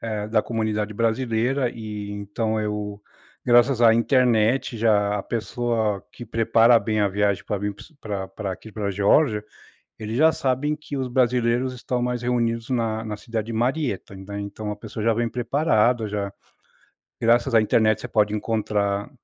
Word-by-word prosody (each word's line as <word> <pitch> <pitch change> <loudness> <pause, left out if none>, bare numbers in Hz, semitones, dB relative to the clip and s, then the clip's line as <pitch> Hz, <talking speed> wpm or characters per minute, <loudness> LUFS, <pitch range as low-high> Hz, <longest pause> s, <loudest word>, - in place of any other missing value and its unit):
eh, 105 -2 -4
da 110 0 +3
comunidade 110 -2 -2
brasileira, 120 +3 0
e, 105 -2 -6
então 110 +2 -2
eu 105 -1 -4 0.4
graças 120 +1 +4
à 115 -1 +7
internet, 120 0 +2
já 105 -2 +2
a - - -4
pessoa 115 -3 -2
que 120 - -9
prepara 115 +1 +4
bem 110 -1 -1
a 100 - +3
viagem 100 0 0
pra 105 - -2
vir 100 +1 -3
p - - -13 0.2
pra 100 -3 -4
pra 100 -3 -5
aqui, 110 +4 -11
pra 105 -1 -3
Geórgia, 105 +3 +2 0.5
eles 110 +2 -4
já 160 +3 +6
sabem 145 0 0
que 150 -2 -7
os 130 -1 -2
brasileiros 125 0 +1
estão 125 0 -3
mais 125 0 -1
reunidos 115 -1 -1
na 115 -3 -1
na 105 -1 -4
cidade 110 0 -4
de 115 - -4
Marietta, 125 -3 -1
né. 100 +2 -7
Então, 105 +1 -5
a - - -4
pessoa 105 +1 -7
já 115 - +4
vem 115 +1 -1
preparada, 120 -2 +1
já. 100 -1 -3 0.9
Graças 120 +2 +3
à 110 - +7
internet, 110 0 +2
você - - -5
pode 105 -1 +1
encontrar 105 -2 -1
110 Hz, 170 wpm, -23 LUFS, 105-120 Hz, 0.9 s, à